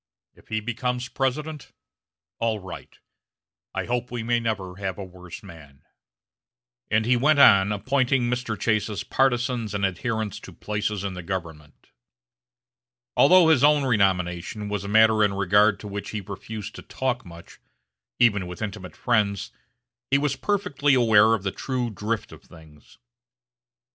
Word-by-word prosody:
If - - -23
he 110 0 -2
becomes 125 +2 -3
President, 150 +3 -3 0.7
all 115 -1 0
right. 95 -3 -10 0.8
I - - -2
hope 125 +1 -2
we 120 -2 -4
may 120 +1 +1
never 100 -5 -3
have 95 -2 -4
a 100 - -5
worse 90 -1 -11
man." 70 -5 -14 1.1
And 110 +1 +2
he 125 +2 +3
went 145 +5 +3
on 100 -7 +6
appointing 130 +4 +1
Mr. 120 -3 -2
Chase's 105 -3 0
partizans 120 -4 0
and 100 -1 +1
adherents 110 +2 -3
to - - -12
places 105 -1 -3
in 100 -1 -3
the 90 - -6
government. 80 -5 -7 1.3
Although 180 -2 +6
his 155 -5 +4
own 150 -1 +5
renomination 95 -2 0
was 105 -2 -3
a - - -6
matter 110 +1 +5
in 100 -1 +1
regard 100 +2 +3
to 105 - -8
which 100 0 -6
he 105 - -4
refused 105 +2 -7
to - - -8
talk 130 -1 -3
much, 85 -1 -14 0.6
even 105 -6 +3
with 90 +4 -7
intimate 90 -4 -6
friends, 105 -5 0 0.6
he 140 - +4
was 140 -1 0
perfectly 180 -9 +1
aware 110 -2 +5
of 100 - -7
the 95 - -1
true 125 0 -3
drift 105 +2 -3
of - - -13
things. 80 -4 -18
110 Hz, 150 wpm, -24 LUFS, 95-125 Hz, 1.3 s, on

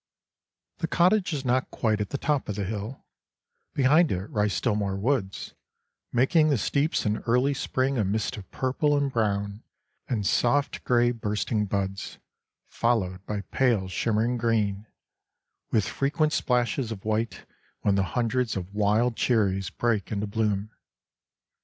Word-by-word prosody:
The 165 - -1
cottage 180 +3 +3
is 140 -4 -3
not 130 +1 +1
quite 110 -3 0
at 105 - -3
the 140 - -2
top 140 -4 -1
of 105 - -2
the 100 - -2
hill; 110 +6 -5 0.7
behind 150 +5 +4
it 95 +2 -2
rise 105 -2 +1
still 90 +6 +1
more 100 -2 -1
woods, 100 -2 -1 0.6
making 155 +6 +3
the 140 - +3
steeps 140 +8 0
in 105 0 0
early 125 +4 +3
spring 130 -1 -1
a - - +3
mist 105 +5 -1
of 100 -4 -10
purple 145 +3 +1
and 140 -1 0
brown 100 -2 -1 0.5
and 110 -5 -1
soft 140 +8 +1
grey 120 -1 +3
bursting 105 -2 -1
buds, 95 0 -3 0.5
followed 95 -6 0
by 105 -1 -2
pale 120 -8 +2
shimmering 115 +5 0
green, 110 -3 0 0.8
with 110 -4 +2
frequent 150 - 0
splashes 125 -2 0
of 105 -3 -7
white 110 +1 -1 0.4
when 100 - +2
the 100 - +2 0.2
hundreds 120 -1 0
of 95 +1 -6
wild 105 +3 +2
cherries 95 -8 +1
break 115 -2 -1
into 105 0 -1
bloom. 105 0 -1
115 Hz, 145 wpm, -26 LUFS, 100-130 Hz, 0.8 s, behind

